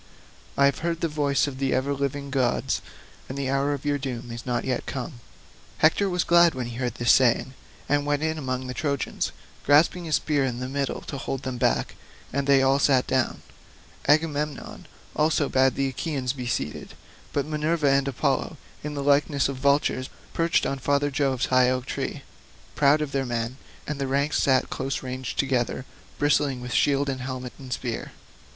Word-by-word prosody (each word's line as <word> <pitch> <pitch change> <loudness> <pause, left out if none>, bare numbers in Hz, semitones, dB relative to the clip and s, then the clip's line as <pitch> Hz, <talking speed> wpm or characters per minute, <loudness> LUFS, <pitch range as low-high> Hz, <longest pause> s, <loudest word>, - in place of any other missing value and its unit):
I 140 - +5
have 140 - +2
heard 165 0 -2
the 165 - +2
voice 145 -3 +1
of 135 -2 -6
the 135 -1 +1
ever 135 +2 0
living 140 0 -3
gods, 130 -3 +1 0.5
and 130 - -5
the 135 -1 -1
hour 140 +1 +1
of 145 0 -4
your 145 -1 +1
doom 125 -3 -5
is 120 +2 -7
not 120 -1 -1
yet 130 -2 -2
come." 130 -1 -5 0.6
Hector 195 +6 +3
was 180 -1 +1
glad 170 -2 +5
when 130 -1 -3
he 120 0 -6
heard 125 -2 -2
this 120 0 +3
saying, 130 0 +3 0.3
and 145 0 +2
went 145 +1 0
in 160 0 -1
among 130 -2 -3
the 125 - -4
Trojans, 140 -1 -2 0.3
grasping 160 +5 +4
his 155 -2 +1
spear 145 -3 +1
by 120 - -7
the 125 +1 -4
middle 140 0 -2
to 140 - -6
hold 135 -1 -4
them 130 -2 -4
back, 60 - +1 0.4
and 140 +1 -1
they 135 -1 +5
all 135 +1 +3
sat 135 -3 +4
down. 130 -1 0 0.6
Agamemnon 150 -1 0 0.3
also 155 -1 +2
bade 130 0 +3
the 135 0 0
Achaeans 130 -2 -2
be 125 -3 -5
seated. 75 - -3 0.4
But 140 - 0
Minerva 155 -1 +1
and 135 0 +2
Apollo, 135 - -1 0.3
in 150 0 -4
the 140 - -3
likeness 140 0 +3
of 135 - -4
vultures, 140 -1 +1 0.2
perched 165 0 +2
on 135 - -2
father 145 +2 +1
Jove's 135 -2 +1
high 130 -1 +6
oak 130 0 -1
tree, - - -4 0.5
proud 145 +1 +4
of 150 -2 -2
their 135 -1 0
men; 120 +1 -2 0.3
and 150 -1 -4
the 135 - 0
ranks 140 +2 +1
sat 130 -2 +2
close 135 0 -3
ranged 130 -1 -5
together, 130 -2 0 0.3
bristling 145 -2 +2
with 125 0 -6
shield 140 0 +2
and 130 -2 -2
helmet 130 -1 -5
and 130 -2 -10
spear. 120 -1 -4
135 Hz, 190 wpm, -25 LUFS, 130-145 Hz, 0.6 s, high